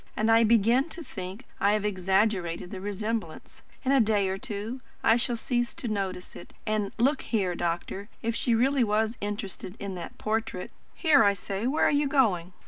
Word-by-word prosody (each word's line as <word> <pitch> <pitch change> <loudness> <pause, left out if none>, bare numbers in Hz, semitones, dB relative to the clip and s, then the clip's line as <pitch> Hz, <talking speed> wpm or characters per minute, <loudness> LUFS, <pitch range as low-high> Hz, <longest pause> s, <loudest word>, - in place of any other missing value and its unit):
And 220 +1 +3
I 225 +1 +6
begin 235 +6 +4
to 335 - -7
think 190 +1 -7
I 200 +1 +3
have 210 -1 0
exaggerated 190 -3 0
the 190 - -6
resemblance. 205 -3 -4 0.2
In 260 - +3
a 275 - +5
day 210 -4 +2
or 190 - -2
two, 225 +2 -5 0.2
I 225 - +6
shall 240 0 +1
cease 240 +1 -1
to - - -4
notice 190 -4 -3
it. - - -11
And, 215 -2 0
look 265 +4 +2
here, 195 -6 0
doctor, 175 +4 -3
if 230 0 -1
she 235 0 +2
really 260 +3 +3
was 220 +1 +1
interested 205 -2 -5
in 200 -1 -4
that 175 -2 -7
portrait 215 -4 -2 0.2
Here, 310 -5 +5
I 200 - +5
say 200 +3 -3
where 295 +4 +2
are - - +4
you 290 0 +2
going?" 195 - +2
215 Hz, 190 wpm, -28 LUFS, 195-235 Hz, 0.2 s, I